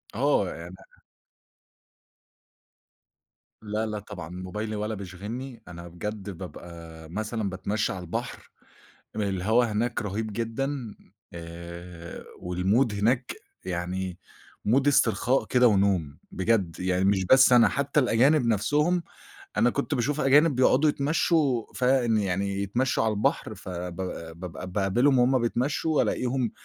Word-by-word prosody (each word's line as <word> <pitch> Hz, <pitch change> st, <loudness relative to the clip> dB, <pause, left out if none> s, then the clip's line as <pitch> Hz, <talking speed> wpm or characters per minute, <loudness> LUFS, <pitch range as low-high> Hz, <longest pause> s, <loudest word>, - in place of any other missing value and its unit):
آه، 130 Hz, -8 st, +2 dB
يعني 85 Hz, +2 st, -9 dB, 2.9 s
لأ 110 Hz, +1 st, -2 dB
لا 105 Hz, -1 st, -3 dB
طبعًا، 90 Hz, -5 st, -9 dB
موبايلي 100 Hz, +4 st, -5 dB
ولا 105 Hz, +1 st, -2 dB
بيشغلني، 110 Hz, +7 st, -7 dB
أنا 85 Hz, 0 st, -9 dB
بجد 100 Hz, +4 st, -6 dB
بابقى 85 Hz, -3 st, -10 dB
مثلًا 110 Hz, +2 st, -3 dB
باتمشى 100 Hz, +3 st, -2 dB
على 95 Hz, -, -6 dB
البحر، 85 Hz, -, -5 dB, 0.7 s
م 110 Hz, -, -3 dB
الهوا 100 Hz, +4 st, +2 dB
هناك 115 Hz, +2 st, -1 dB
رهيب 105 Hz, +2 st, -3 dB
جدًا، 120 Hz, +1 st, -3 dB, 0.4 s
آآ، 85 Hz, 0 st, -9 dB
والمود 100 Hz, +7 st, +1 dB
هناك 120 Hz, +5 st, +1 dB, 0.3 s
يعني 90 Hz, 0 st, -3 dB, 0.5 s
مود 130 Hz, +6 st, +3 dB
استرخاء 125 Hz, 0 st, +3 dB
كده 125 Hz, -1 st, +4 dB
ونوم، 95 Hz, -8 st, +1 dB
بجد 95 Hz, -5 st, 0 dB
يعني 90 Hz, 0 st, +1 dB
مش 95 Hz, -1 st, +2 dB
بس 130 Hz, +2 st, +6 dB
أنا 120 Hz, -1 st, +7 dB
حتى 140 Hz, +1 st, +1 dB
الأجانب 130 Hz, +2 st, +3 dB
نَفسهم، 150 Hz, -, +2 dB, 0.6 s
أنا 120 Hz, -, +4 dB
كنت 120 Hz, -, -2 dB
باشوف 140 Hz, +5 st, 0 dB
أجانب 145 Hz, +2 st, +5 dB
بيقعُدوا 130 Hz, +4 st, +4 dB
يتمشوا، 145 Hz, -4 st, +1 dB
فان 125 Hz, -3 st, +2 dB
يعني 100 Hz, 0 st, -1 dB
يتمشوا 120 Hz, +5 st, 0 dB
على 110 Hz, -, +2 dB
البحر 105 Hz, -, 0 dB
فب 90 Hz, -1 st, -6 dB, 0.4 s
بابقى 90 Hz, +1 st, -7 dB
باقابلهم 115 Hz, +8 st, +2 dB
وهُم 130 Hz, +1 st, +4 dB
بيتمشوا، 145 Hz, +6 st, +1 dB
ألاقيهم 125 Hz, -2 st, 0 dB
105 Hz, 120 wpm, -26 LUFS, 95-125 Hz, 2.9 s, أنا